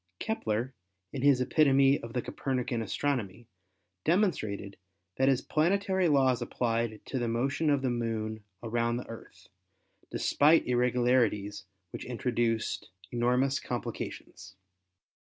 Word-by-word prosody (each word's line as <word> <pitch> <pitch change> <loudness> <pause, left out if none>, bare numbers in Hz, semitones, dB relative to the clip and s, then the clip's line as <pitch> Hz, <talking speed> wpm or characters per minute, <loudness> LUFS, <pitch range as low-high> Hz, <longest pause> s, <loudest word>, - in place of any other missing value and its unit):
Kepler 120 - -2 0.4
in 135 - -3
his 140 -2 +4
Epitome 135 0 +4
of 115 0 -9
the 125 - -1
Copernican 125 -3 -2
astronomy 120 -4 -2 0.6
demonstrated 110 - 0 0.4
that 135 - +3
his 135 -1 +3
planetary 190 +3 +1
laws 130 -5 +3
applied 115 -2 -2
to 130 - -3
the 120 - -1
motion 130 +7 0
of 140 -2 +2
the 130 - +1
Moon 110 -2 -3 0.2
around 120 +1 0
the 125 - -6
Earth, 115 - -12 0.6
despite 155 +3 +3
irregularities 120 -5 +1 0.3
which - - -7
introduced 120 -2 -1 0.2
enormous 125 +3 +1
complications. - - -6
125 Hz, 115 wpm, -30 LUFS, 115-135 Hz, 0.6 s, his